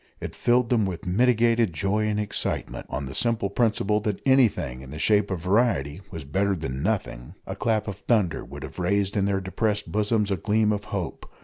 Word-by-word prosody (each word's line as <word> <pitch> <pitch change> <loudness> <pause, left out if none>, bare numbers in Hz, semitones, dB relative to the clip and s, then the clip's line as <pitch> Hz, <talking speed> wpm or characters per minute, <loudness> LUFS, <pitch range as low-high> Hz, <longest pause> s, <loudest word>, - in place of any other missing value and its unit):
It - - -6
filled 120 0 +2
them 110 -5 +3
with 90 -3 -5
mitigated 115 +1 +3
joy 100 +5 0
and 105 0 0
excitement, 105 - -3
on 70 - -3
the 65 - -7
simple 115 - 0
principle 105 -2 +1
that 105 -2 -2
anything 120 - +3
in 65 - -11
the 75 - -7
shape 105 +4 +2
of 90 -4 -3
variety 90 - +1
was 80 - -7
better 95 +8 0
than 70 -6 -4
nothing. 90 - -2
A - - -5
clap 110 -2 0
of 100 -2 -4
thunder 100 -6 +1
would - - -9
have - - -8
raised 100 +2 +1
in 100 -2 +2
their 100 -1 +1
depressed 105 +2 -2
bosoms 105 0 +1
a 95 - +1
gleam 105 +3 +2
of 105 -1 -2
hope. - - -5
100 Hz, 200 wpm, -25 LUFS, 90-110 Hz, -, them